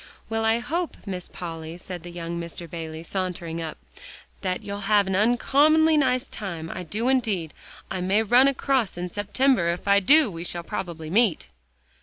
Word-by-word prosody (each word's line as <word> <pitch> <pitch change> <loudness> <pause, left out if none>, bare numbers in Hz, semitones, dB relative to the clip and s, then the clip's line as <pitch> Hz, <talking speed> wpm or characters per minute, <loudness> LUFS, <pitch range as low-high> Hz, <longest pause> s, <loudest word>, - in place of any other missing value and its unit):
"Well, 225 0 0
I 225 +1 +4
hope, 325 +9 -3
Miss 185 -3 -5
Polly," 165 -1 -7
said 180 -1 -8
young 170 -1 -5
Mr. 170 0 -7
Bayley, 160 -1 -6
sauntering 170 -2 -3
up, 160 -1 -5 0.6
"that 185 -1 -2
you'll 200 0 -5
have 205 -1 +5
an 190 0 -1
uncommonly 290 +9 +4
nice 260 -2 +2
time, 170 -6 -6
I - - -5
do 210 +8 -3
indeed. 215 - 0 0.4
I 185 - -2
may 195 +4 +2
run 245 +5 +6
across 265 -6 0
in 180 +1 -3
September; 205 -1 +2
if 175 +3 -3
I 200 0 +6
do, 280 +4 +5
we 165 -1 -6
shall 175 -1 -3
probably 165 -2 -5
meet." 210 -3 +2
190 Hz, 170 wpm, -25 LUFS, 170-240 Hz, 0.6 s, run